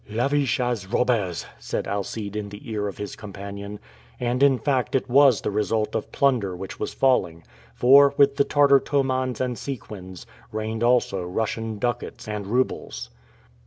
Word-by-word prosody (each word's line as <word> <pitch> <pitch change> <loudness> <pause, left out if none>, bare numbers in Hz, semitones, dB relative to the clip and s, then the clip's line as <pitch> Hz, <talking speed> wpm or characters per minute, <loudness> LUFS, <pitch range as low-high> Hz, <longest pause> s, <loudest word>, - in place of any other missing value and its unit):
"Lavish 130 +4 +1
as 120 -6 -1
robbers," 110 -6 0
said - - -3
Alcide 100 +1 -4
in 105 -1 -4
the 105 0 -11
ear 105 -1 -1
of 100 - -6
his 105 -1 -6
companion. 100 0 -8 0.4
And 125 +1 -1
in 140 -2 +5
fact 130 +1 0
it 130 - 0
was 135 -2 +5
the - - -2
result 105 +1 0
of - - -3
plunder 120 -10 +1
which 95 +2 -8
was - - -3
falling; 90 -11 +1 0.3
for, 140 +3 +6
with 140 -1 +4
the 140 - +5
Tartar 140 -1 +5
tomans 130 -3 -1
and 125 -2 -2
sequins, 95 - -7 0.3
rained 110 +1 -3
also 120 -6 +2
Russian 110 +4 -3
ducats 120 0 -3
and 105 -2 -4
roubles. 125 +5 -2
115 Hz, 160 wpm, -24 LUFS, 100-130 Hz, 0.4 s, for